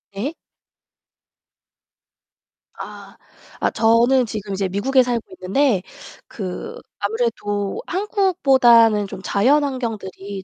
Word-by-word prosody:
네. 250 +11 -3 2.5
아, - - -10 0.4
아 - - +1
저는 235 +3 +3
지금 210 -3 -6
이제 195 0 -1
미국에 255 +8 +2
살고 240 -2 -1 0.2
있는데 195 +1 +1 0.4
그 185 -4 -7 0.2
아무래도 205 -2 -2
한국보다는 270 - +3
좀 190 - -9
자연환경들이 220 -6 -1
225 Hz, 195 characters per minute, -20 LUFS, 200-265 Hz, 2.5 s, 저는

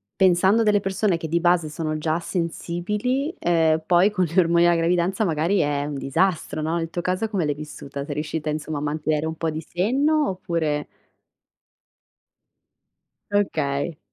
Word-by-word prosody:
pensando 190 +4 +4
a - - +3
delle 210 -1 +4
persone 195 -2 0
che 160 - -5
di 170 +2 +1
base 175 -2 +2
sono 155 0 -3
già 155 +2 -1
sensibili, 200 - -2
ehm, 160 -2 +2
poi 180 +3 +4
con 185 -3 +1
gli 170 +3 -6
ormoni 170 0 +4
alla 175 - +4
gravidanza 175 +5 +1
magari 170 +3 +1
è 145 -1 0
un 150 - -4
disastro, 155 +4 0
no, 160 +2 -1
nel 165 -1 -3
tuo 175 +1 -3
caso 185 +5 -1
come 195 -6 0
l'hai 145 - 0
vissuta? 140 -2 -7
Sei 145 - -4
riuscita, 155 0 -3
insomma, 155 0 -3
a - - -6
mantenere 150 +1 -1
un 160 0 -3
po' 165 0 -2
di 155 +1 -4
senno, 275 - +1
oppure 160 -5 -2 2.5
Okay. 155 -6 0
170 Hz, 165 wpm, -23 LUFS, 155-190 Hz, 2.5 s, pensando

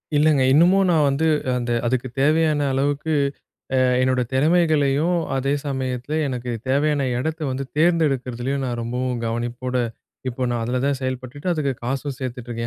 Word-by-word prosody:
இல்லைங்க. 150 -1 +4
இன்னமும் 180 +6 +5
நான் 160 -4 +4
வந்து, 140 +3 +1 0.3
அந்த 120 -1 -2
அதுக்குத் 125 0 -1
தேவையான 155 +1 +3
அளவுக்கு, 145 +3 0 0.6
அ - - +4 0.2
என்னோட 130 0 +2
திறமைகளையும், 155 +1 +2 0.2
அதே 135 +2 0
சமயத்தில 130 +1 -2
எனக்கு 125 -2 -4 0.2
தேவையான 140 +1 +2
எடத்தை 160 +4 -3
வந்து 130 +1 -3
தேர்ந்தெடுக்கிறதுலேயும் 140 -5 +1
நான் 120 -1 -3
ரொம்பவும் 125 +1 -2
கவனிப்போட 120 +2 -3 0.5
இப்போ 130 +1 -4
நான் 120 -1 -1
அதில 125 +2 -1
தான் 140 -1 +1
செயல்பட்டுட்டு, 130 +4 -4
அதுக்கு 150 -5 0
காசும் 135 +2 -3
சேர்த்துட்ருக்கேன். 120 -2 -5
135 Hz, 135 wpm, -22 LUFS, 125-150 Hz, 0.6 s, இன்னமும்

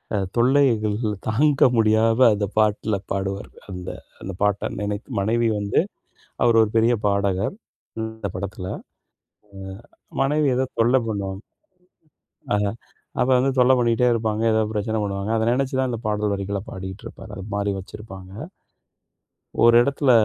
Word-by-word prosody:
அ - - +1 0.2
தொல்லைகள் 120 -4 +3 0.3
தாங்க 140 +6 +2 0.2
முடியாம 115 +1 +3
அந்தப் 100 0 -3
பாட்டுல 110 0 +2 0.2
பாடுவாரு. 95 0 -3 0.2
அந்த 90 -1 -6 0.3
அந்தப் 95 -1 -7
பாட்ட 105 -1 +1
நெனைத்து. 105 +4 -4
மனைவி 115 +3 +1
வந்து 100 0 +1 0.7
அவரு 115 -1 +4
1 105 - +1
பெரிய 115 +2 +4
பாடகர், 100 - 0 0.5
அந்தப் 110 -4 -5
படத்துல. 95 -1 -5 1.4
அ - - -15
மனைவி 145 +1 +2
எதோ 130 0 +1
தொல்ல 120 +3 +4
பண்ணுவாங் 100 -1 -3 1.1
அ - - +3 0.6
அப்ப 125 - +2
வந்து 135 +2 +2
தொல்ல 125 +1 +6
பண்ணிட்டே 120 +1 +2
இருப்பாங்க. 110 -1 -1
ஏதாவது 110 0 +1
பிரச்சனை 110 +1 -1
பண்ணுவாங்க. 100 +1 -3
அத 110 - +1
நெனைச்சுதான் 130 0 0
இந்தப் 115 -1 -5
பாடல் 105 -1 0
வரிகளப் 100 +1 -4
பாடிட்டு 95 +2 -7
இருப்பாரு. - - -11
அது 95 - -6
மாரி 100 0 0
வச்சுருப்பாங்க. 95 -1 -10 1.3
ஒரு 120 0 +7
இடத்துல, 140 0 +1
110 Hz, 135 wpm, -23 LUFS, 100-120 Hz, 1.4 s, ஒரு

